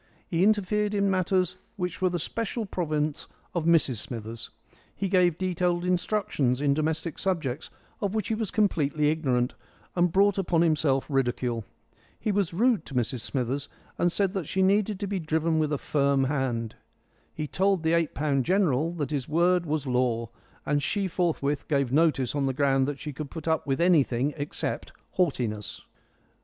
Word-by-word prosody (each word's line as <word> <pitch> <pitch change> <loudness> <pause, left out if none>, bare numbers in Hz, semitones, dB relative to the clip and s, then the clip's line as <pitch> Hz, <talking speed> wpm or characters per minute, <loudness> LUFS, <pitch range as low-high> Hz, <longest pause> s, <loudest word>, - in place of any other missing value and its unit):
He 170 -1 0
interfered 210 0 +2
in 200 -1 +2
matters 185 -1 +1 0.2
which 180 -1 -4
were 185 - +3
the 175 - -1
special 230 +6 -3
province 155 -5 -2 0.3
of 170 -3 -1
Mrs 165 -7 +4
Smithers. 115 0 -6 0.5
He 195 - -2
gave 180 -3 +3
detailed 180 -1 0
instructions 180 - 0
in 145 -1 +2
domestic 155 +1 -2
subjects 160 -9 -2 0.3
of 200 +1 -1
which 215 -3 -1
he - - +1
was 220 -2 -2
completely 150 -8 +2
ignorant, 130 -5 0 0.4
and 175 -1 +3
brought 200 +2 +3
upon 170 -3 +2
himself 150 -5 +2
ridicule. 125 -4 -1 0.5
He 215 - 0
was 200 -4 +1
rude 220 +1 +2
to 135 - -8
Mrs 125 0 0
Smithers, 135 +2 -2 0.3
and 175 - +3
said 195 +1 +1
that 190 -7 -3
she 190 - +1
needed 200 +1 +2
to - - 0
be 200 -1 -2
driven 160 0 0
with 155 -1 +1
a 145 - +1
firm 140 -1 +1
hand. 130 -5 -1 0.6
He 155 - -4
told 190 +3 +1
the 160 +1 +2
eight 170 -2 +1
pound 140 -2 +1
general 170 -3 +2
that 155 -4 -3
his 140 -4 -2
word 175 +2 +3
was 150 -1 -1
law, 125 -3 0 0.3
and 145 0 +1
she 200 +6 0
forthwith 160 -5 -1
gave 140 -4 +1
notice 150 -5 +3
on 140 -2 0
the 135 - 0
ground 135 -1 +2
that 145 -1 -3
she 150 - -6
could 145 +1 -6
put 160 +1 -8
up 160 -1 +1
with 135 -1 0
anything 145 -6 +3
except 145 -1 -3 0.3
haughtiness. 120 - -1
160 Hz, 170 wpm, -27 LUFS, 140-185 Hz, 0.6 s, Mrs